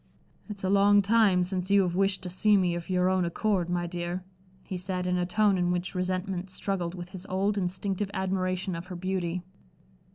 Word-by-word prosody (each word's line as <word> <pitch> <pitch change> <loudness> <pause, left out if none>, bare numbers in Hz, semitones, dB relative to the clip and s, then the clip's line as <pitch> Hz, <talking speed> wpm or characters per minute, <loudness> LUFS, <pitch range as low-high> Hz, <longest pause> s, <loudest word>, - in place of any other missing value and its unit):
"It's 205 -2 -7
a 190 - +1
long 200 0 +5
time 205 -3 +4
since 185 0 -3
you 200 -1 +5
have 175 -2 -1
wished 195 +1 +1
to 180 - -3
see 205 +3 +4
me 180 -2 +2
of 170 +1 -5
your 180 0 +2
own 185 -1 +2
accord, 180 +1 0
my 175 0 0
dear," 175 +1 -4 0.4
he 190 - -5
said, 180 0 -2
in 180 0 +1
a 175 - 0
tone 205 0 +3
in 175 0 +1
which 180 0 -2
resentment 185 0 -2
struggled 185 -2 -2
with 175 -1 -7
his 185 0 -8
old, 195 +2 0
instinctive 195 +1 -2
admiration 185 -1 -1
of 170 +2 -7
her 185 - -6
beauty. 180 -1 -2
185 Hz, 200 wpm, -28 LUFS, 180-195 Hz, 0.4 s, long